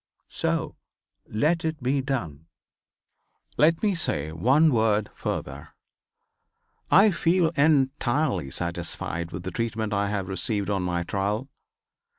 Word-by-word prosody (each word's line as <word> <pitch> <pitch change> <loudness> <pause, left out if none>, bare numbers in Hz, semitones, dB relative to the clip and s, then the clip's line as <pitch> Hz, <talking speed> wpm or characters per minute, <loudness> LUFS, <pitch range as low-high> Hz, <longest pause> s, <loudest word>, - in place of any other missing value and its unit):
So - - -2 0.5
let 155 +10 +1
it 160 -4 -3
be 135 +2 +1
done. 85 - -4 1.1
"Let 165 +5 +3
me 205 -2 +3
say 80 - -2
one 130 - +3
word 110 -2 +1
further. - - -5 1.1
I 200 +2 +6
feel 170 0 +2
entirely 140 - +1
satisfied 85 +1 -3
with 85 +1 -6
the 95 - -4
treatment 110 -2 -2
I 100 0 0
have 100 -3 -2
received 100 +2 -2
on 100 -2 0
my 90 -1 -1
trial. 100 +8 -2
110 Hz, 120 wpm, -25 LUFS, 90-150 Hz, 1.1 s, I